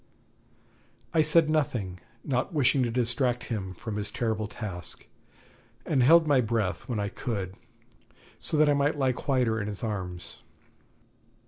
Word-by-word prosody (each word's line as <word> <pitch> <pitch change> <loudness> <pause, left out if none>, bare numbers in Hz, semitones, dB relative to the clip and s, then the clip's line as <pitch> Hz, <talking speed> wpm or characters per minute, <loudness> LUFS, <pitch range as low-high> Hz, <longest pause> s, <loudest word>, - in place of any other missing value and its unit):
I 160 - +5
said 155 +1 +5
nothing, 120 - -1 0.2
not 125 -3 -1
wishing 140 -1 +3
to 120 - +1
distract 125 +1 0
him 95 -4 -3
from 105 +4 -6
his 105 0 -1
terrible 110 -1 -2
task, 95 -6 -7 0.8
and 140 -5 +2
held 160 +6 +6
my 145 -4 +4
breath, 110 -3 -2
when 115 -4 -1
I 100 - -1
could, 100 -5 -4 0.9
so 155 - 0
that 155 0 +5
I 145 - +4
might 145 +1 +1
lie 135 -2 +2
quieter 125 -4 0
in 100 - -4
his 105 +1 -5
arms. 95 -5 -5
120 Hz, 145 wpm, -28 LUFS, 105-140 Hz, 0.9 s, held